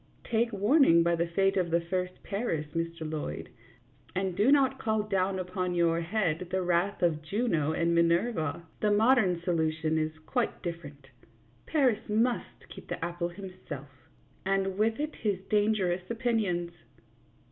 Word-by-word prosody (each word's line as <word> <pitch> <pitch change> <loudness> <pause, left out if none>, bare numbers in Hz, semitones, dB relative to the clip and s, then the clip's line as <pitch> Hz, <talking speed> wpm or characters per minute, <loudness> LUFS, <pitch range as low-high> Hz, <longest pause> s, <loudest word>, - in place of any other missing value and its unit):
Take 235 0 0
warning 205 - +5
by 170 0 +2
the 170 +1 0
fate 195 +3 +1
of 180 -2 +1
the 170 +1 +3
first 180 +1 -3
Paris, 195 -7 -2
Mr. 165 0 -3
Lloyd, 150 - -5 0.7
and 190 -1 -1
do 215 +8 +4
not 270 -2 +3
call 220 -1 0
down 195 -2 0
upon 180 -1 -2
your 170 -1 +2
head 175 -2 -1
the 185 0 0
wrath 180 +3 0
of 160 -3 +2
Juno 160 -3 0
and 170 +1 +1
Minerva. 170 0 +1 0.2
The 210 - +2
modern 210 -4 +4
solution 160 -2 0
is 155 0 -2
quite 245 -3 -1
different; 145 -6 -7 0.6
Paris 250 -8 +1
must 230 +3 -1
keep - - -11
the - - -3
apple 175 0 -3
himself, 180 -7 -9 0.5
and 195 0 0
with 220 +2 +2
it 305 +1 -3
his 205 -4 -1
dangerous 200 -4 +1
opinions. 220 -8 0
185 Hz, 145 wpm, -29 LUFS, 170-215 Hz, 0.7 s, warning